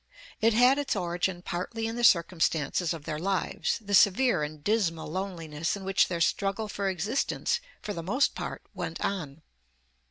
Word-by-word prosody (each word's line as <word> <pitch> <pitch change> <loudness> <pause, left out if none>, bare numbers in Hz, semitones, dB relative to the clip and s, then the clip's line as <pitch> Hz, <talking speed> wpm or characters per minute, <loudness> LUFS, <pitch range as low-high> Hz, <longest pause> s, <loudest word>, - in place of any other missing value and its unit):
It 225 0 +4
had 250 +4 +5
its 285 -5 -1
origin 175 -1 -2
partly 225 +7 -3
in 225 +1 -3
the 240 - -3
circumstances 170 -4 +3
of 165 -3 -5
their 155 -1 -3
lives, 190 +2 -1
the 205 -2 -6
severe 200 -1 +5
and 150 0 -5
dismal 195 -7 0
loneliness 165 -4 -3
in 195 - -9
which 195 +1 +3
their 170 -2 -3
struggle 195 +5 0
for 200 -1 -2
existence 210 - -1 0.2
for 210 - -3
the 170 - -4
most 235 - +1
part - - -6
went - - -5
on. 160 -6 -4
190 Hz, 165 wpm, -28 LUFS, 165-215 Hz, 0.2 s, had